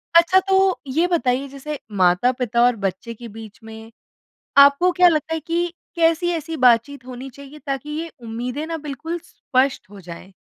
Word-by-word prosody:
अच्छा 340 Hz, +3 st, +6 dB
तो 385 Hz, -1 st, +3 dB
ये 320 Hz, +7 st, +1 dB
बताइए 275 Hz, -6 st, 0 dB
जैसे 280 Hz, +2 st, -7 dB, 0.2 s
माता-पिता 235 Hz, +6 st, +2 dB
और 245 Hz, -1 st, +3 dB
बच्चे 200 Hz, +2 st, -4 dB
के 235 Hz, +1 st, -11 dB
बीच 220 Hz, +1 st, -11 dB
में 220 Hz, 0 st, -11 dB, 0.7 s
आपको 280 Hz, +6 st, +6 dB
क्या 360 Hz, 0 st, +5 dB
लगता 320 Hz, -1 st, 0 dB
है 325 Hz, -, -1 dB
कि 340 Hz, +2 st, -2 dB, 0.2 s
कैसी 335 Hz, +1 st, +2 dB
ऐसी 325 Hz, -1 st, -4 dB
बातचीत 250 Hz, +1 st, +2 dB
होनी 255 Hz, +1 st, -8 dB
चाहिए 280 Hz, +3 st, -13 dB
ताकि 275 Hz, +1 st, -4 dB
ये 335 Hz, +1 st, -5 dB
उम्मीदें 245 Hz, +6 st, -4 dB
ना 330 Hz, 0 st, -3 dB
बिल्कुल 310 Hz, +3 st, -5 dB
स्पष्ट 260 Hz, -4 st, -1 dB
हो 205 Hz, 0 st, -12 dB
जाएँ? 180 Hz, +2 st, -11 dB
275 Hz, 165 wpm, -21 LUFS, 235-325 Hz, 0.7 s, अच्छा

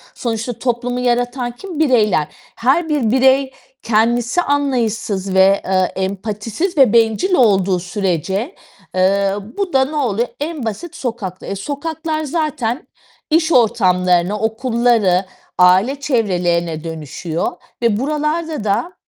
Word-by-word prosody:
sonuçta 235 Hz, 0 st, -3 dB
toplumu 245 Hz, 0 st, -1 dB
yaratan 245 Hz, 0 st, 0 dB
kim? 330 Hz, +6 st, -8 dB
Bireyler. 215 Hz, -, +3 dB, 0.3 s
Her 300 Hz, +8 st, +1 dB
bir 275 Hz, -8 st, +1 dB
birey 265 Hz, +1 st, +3 dB, 0.3 s
kendisi 235 Hz, +6 st, +2 dB
anlayışsız 230 Hz, -, -1 dB
ve, 190 Hz, +1 st, +4 dB
eee, 185 Hz, -1 st, +1 dB
empatisiz 210 Hz, -, -3 dB
ve 260 Hz, -6 st, +5 dB
bencil 230 Hz, -, +2 dB
olduğu 195 Hz, -, +3 dB
sürece, 190 Hz, -, -2 dB, 0.4 s
eee, 195 Hz, +1 st, +2 dB, 0.2 s
bu 395 Hz, -3 st, -2 dB
da 265 Hz, 0 st, +4 dB
noluyor? 250 Hz, -6 st, -1 dB
En 300 Hz, -3 st, -4 dB
basit 325 Hz, -, -5 dB
sokakta. 225 Hz, -, -5 dB
E, 195 Hz, -, -4 dB
sokaklar 310 Hz, -, -4 dB
zaten 300 Hz, -, -2 dB, 0.4 s
iş 320 Hz, +1 st, +2 dB
ortamlarına, 185 Hz, -, +2 dB
okulları, 225 Hz, -4 st, +1 dB, 0.3 s
aile 185 Hz, +10 st, +4 dB
çevrelerine 175 Hz, -, 0 dB
dönüşüyor 160 Hz, +1 st, -4 dB, 0.3 s
ve 225 Hz, -3 st, +2 dB
buralarda 300 Hz, 0 st, -2 dB
da 215 Hz, -, -1 dB
235 Hz, 115 wpm, -18 LUFS, 195-280 Hz, 0.4 s, ve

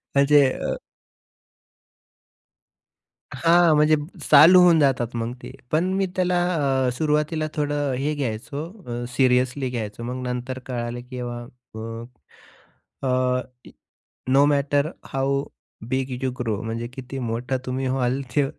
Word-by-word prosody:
म्हणजे 140 Hz, +1 st, +6 dB
अ -, -, -3 dB, 2.6 s
हां 170 Hz, -1 st, +4 dB
म्हणजे 150 Hz, +1 st, +4 dB, 0.3 s
चालू 170 Hz, +6 st, +9 dB
होऊन 175 Hz, -2 st, +6 dB
जातात 125 Hz, -4 st, +1 dB
मग 115 Hz, +1 st, -2 dB
ते. -, -, -8 dB, 0.2 s
पण 175 Hz, +5 st, +1 dB
मी 195 Hz, 0 st, +1 dB
त्याला 180 Hz, -1 st, +1 dB, 0.5 s
अ, -, -, +2 dB
सुरुवातीला 155 Hz, +3 st, 0 dB
थोडं 145 Hz, -2 st, -1 dB
हे 145 Hz, +3 st, -1 dB
घ्यायचो 140 Hz, +1 st, -4 dB, 0.4 s
अ, -, -, -3 dB
सिरियसली 130 Hz, +1 st, +2 dB
घ्यायचो 115 Hz, -2 st, -5 dB
मग 125 Hz, +1 st, -4 dB
नंतर 125 Hz, +1 st, -4 dB
कळालं 120 Hz, -1 st, -4 dB
की 130 Hz, -, -6 dB
अ, 125 Hz, -, -4 dB, 1.8 s
अ, 125 Hz, -1 st, +1 dB, 0.9 s
no 135 Hz, +2 st, +5 dB
matter 145 Hz, +1 st, +1 dB, 0.2 s
how 140 Hz, +1 st, 0 dB, 0.4 s
big 130 Hz, 0 st, -1 dB
you 130 Hz, -, 0 dB
grow 110 Hz, -4 st, -1 dB
म्हणजे 115 Hz, +1 st, -4 dB
किती 130 Hz, 0 st, -7 dB
मोठा 120 Hz, +2 st, -2 dB
तुम्ही 130 Hz, +1 st, -2 dB
व्हाल, 130 Hz, 0 st, 0 dB, 0.2 s
ते 145 Hz, -, +4 dB
135 Hz, 125 wpm, -23 LUFS, 125-150 Hz, 2.6 s, चालू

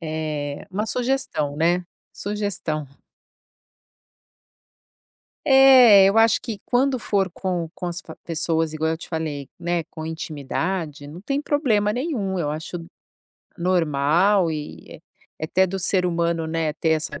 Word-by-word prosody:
eh, 155 Hz, -3 st, -4 dB
uma 210 Hz, +3 st, -2 dB
sugestão, 245 Hz, -, -1 dB
né. 175 Hz, +3 st, +2 dB, 0.3 s
Sugestão. 200 Hz, -7 st, -3 dB, 2.6 s
É 260 Hz, -7 st, +8 dB
eu 195 Hz, -, +2 dB
acho 225 Hz, 0 st, +5 dB
que 225 Hz, -4 st, -5 dB
quando 255 Hz, +1 st, +1 dB
for 195 Hz, -4 st, 0 dB
com 175 Hz, -2 st, -3 dB
com 180 Hz, -, -8 dB
as 175 Hz, +1 st, -3 dB
pa 160 Hz, -, -12 dB
pessoas 165 Hz, -1 st, -1 dB
igual 160 Hz, +1 st, -1 dB
eu 160 Hz, -, -2 dB
te -, -, -11 dB
falei, 155 Hz, -4 st, -4 dB
né, 175 Hz, 0 st, -1 dB
com 160 Hz, -1 st, -7 dB
intimidade, 160 Hz, 0 st, -4 dB
não 155 Hz, +5 st, -10 dB
tem 275 Hz, +8 st, -2 dB
problema 230 Hz, -9 st, +1 dB
nenhum, 230 Hz, -, -2 dB
eu 150 Hz, -4 st, -1 dB
acho 160 Hz, +3 st, -5 dB, 0.8 s
normal 170 Hz, +2 st, +2 dB
e 150 Hz, -1 st, -6 dB, 0.5 s
é -, -, -4 dB
até 190 Hz, +4 st, +2 dB
do 190 Hz, +1 st, -4 dB
ser 185 Hz, 0 st, +1 dB
humano, 170 Hz, -1 st, 0 dB
né, 160 Hz, -1 st, -1 dB
ter 160 Hz, +1 st, -1 dB
essa 155 Hz, -1 st, -1 dB
175 Hz, 135 wpm, -23 LUFS, 160-205 Hz, 2.6 s, É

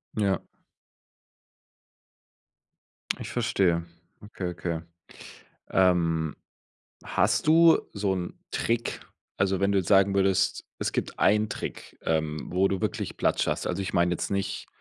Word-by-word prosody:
Ja. 100 Hz, -3 st, +1 dB, 2.8 s
Ich -, -, -6 dB
verstehe. 85 Hz, -3 st, +1 dB, 0.4 s
Okay, 100 Hz, -3 st, -5 dB
okay. 85 Hz, -1 st, -3 dB, 0.9 s
Ähm, 85 Hz, -4 st, +2 dB, 0.7 s
hast -, -, +1 dB
du 165 Hz, +1 st, +7 dB
so 100 Hz, -2 st, 0 dB
'n 90 Hz, -1 st, -4 dB, 0.2 s
Trick, 115 Hz, 0 st, -1 dB, 0.4 s
also, 95 Hz, 0 st, +1 dB
wenn 100 Hz, +1 st, +2 dB
du 100 Hz, -, +3 dB
jetzt 90 Hz, -, -4 dB
sagen 100 Hz, 0 st, +5 dB
würdest, 95 Hz, -1 st, +2 dB
es -, -, -2 dB
gibt -, -, -3 dB
einen 105 Hz, 0 st, +3 dB
Trick, -, -, -6 dB
ähm, 80 Hz, -1 st, -1 dB
wo 95 Hz, +2 st, +3 dB
du 95 Hz, -1 st, -1 dB
wirklich -, -, -3 dB
Platz -, -, +1 dB
schaffst -, -, 0 dB
also, 90 Hz, +2 st, -2 dB
ich 95 Hz, -, -4 dB
meine 85 Hz, 0 st, +3 dB
jetzt 90 Hz, -, -2 dB
nicht, 100 Hz, 0 st, -2 dB
95 Hz, 130 wpm, -27 LUFS, 85-100 Hz, 2.8 s, du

